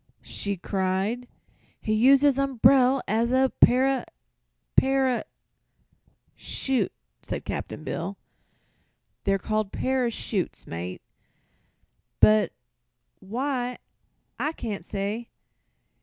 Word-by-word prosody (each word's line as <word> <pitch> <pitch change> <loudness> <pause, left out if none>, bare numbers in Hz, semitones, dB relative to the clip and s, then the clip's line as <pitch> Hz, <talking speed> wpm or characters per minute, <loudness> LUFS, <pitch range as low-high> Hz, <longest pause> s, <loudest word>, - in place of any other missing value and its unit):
she 200 -1 -3
cried. 195 +6 -1 0.5
"He 215 - -1
used 265 +6 +5
his 280 -2 +4
umbrel 265 0 +4
as 225 +3 +1
a 260 0 +3
para 260 +1 +5 0.7
para 265 -2 +3 0.6
" - - -40
"Shoot," 265 -2 -1 0.3
said - - -5
Cap'n - - -5
Bill. - - -4 1.1
"They're 195 -1 +3
called 215 +1 -1
parashoots, 240 -7 -1
mate; 85 +2 -6 1.2
but 105 0 +5 0.7
why, 250 +4 -2 0.6
I 305 - 0
can't 210 - -5
say. 205 +5 -4
240 Hz, 90 wpm, -26 LUFS, 200-265 Hz, 1.2 s, used